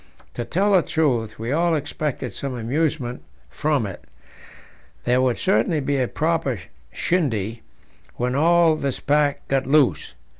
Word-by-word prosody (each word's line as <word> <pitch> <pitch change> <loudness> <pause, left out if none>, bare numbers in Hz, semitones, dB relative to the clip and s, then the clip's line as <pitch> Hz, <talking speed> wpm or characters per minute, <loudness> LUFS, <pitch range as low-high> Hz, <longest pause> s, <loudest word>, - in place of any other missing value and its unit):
To 120 - -3
tell 195 - +1
the 190 -3 +6
truth, 125 -10 0
we 115 +3 -4
also 165 +2 +2
expected 150 -1 -3
some 135 -2 -4
amusement 125 +1 -1 0.3
from 145 -6 0
it; 95 -3 -7 1.0
there 125 +1 +2
would 125 -2 +1
certainly 115 +9 +2
be 140 0 -1
a 130 -2 +1
proper 155 - -1 0.3
shindy 115 - -1 0.5
when 125 +1 -1
all 165 +3 +4
this 140 -3 -2
pack 145 0 +1
got 135 -1 0
loose. 145 -2 +2
140 Hz, 140 wpm, -23 LUFS, 120-155 Hz, 1.0 s, the